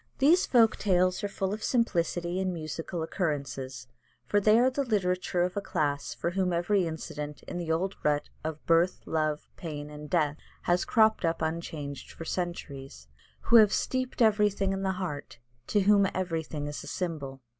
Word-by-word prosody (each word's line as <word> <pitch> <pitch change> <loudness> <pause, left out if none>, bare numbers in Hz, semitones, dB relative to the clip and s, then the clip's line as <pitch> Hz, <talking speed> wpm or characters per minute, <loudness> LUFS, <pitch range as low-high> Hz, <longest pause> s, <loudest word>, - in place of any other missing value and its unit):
These 325 +7 +4
folk 230 -3 +4
tales 185 -1 +2
are - - +1
full 195 -1 -2
of 215 0 -5
simplicity 175 -6 0
and 190 -1 0
musical 165 +1 -4
occurrences, 135 -7 -3 0.4
for 205 - +2
they 215 +2 +5
are 250 +2 +4
the 280 +2 0
literature 185 -6 0
of 180 0 -2
a 200 - -1
class 145 -7 -1
for 170 - -2
whom 185 0 0
every 175 +2 +1
incident 150 -2 -6
in 175 - -5
the 165 -2 -2
old 185 +4 0
rut 150 -1 +1 0.2
of 155 -1 -5
birth, 170 +2 +3
love, 155 -1 -1
pain, 150 -3 -6
and 150 0 -9
death 150 -4 +1 0.3
has 175 +1 +2
cropped 220 -3 +3
up 165 -1 0
unchanged 160 -3 -4
for 165 - -8
centuries: 140 - -5 0.3
who 235 - +6
have 215 -2 +7
steeped 255 -1 0
everything 205 -3 +3
in 195 - -3
the 190 -1 0
heart: 170 -9 -5 0.3
to 205 - +2
whom 200 0 +5
everything 165 -5 -2
is 145 0 -5
a - - -10
symbol. 145 -7 -4
175 Hz, 175 wpm, -29 LUFS, 150-200 Hz, 0.4 s, have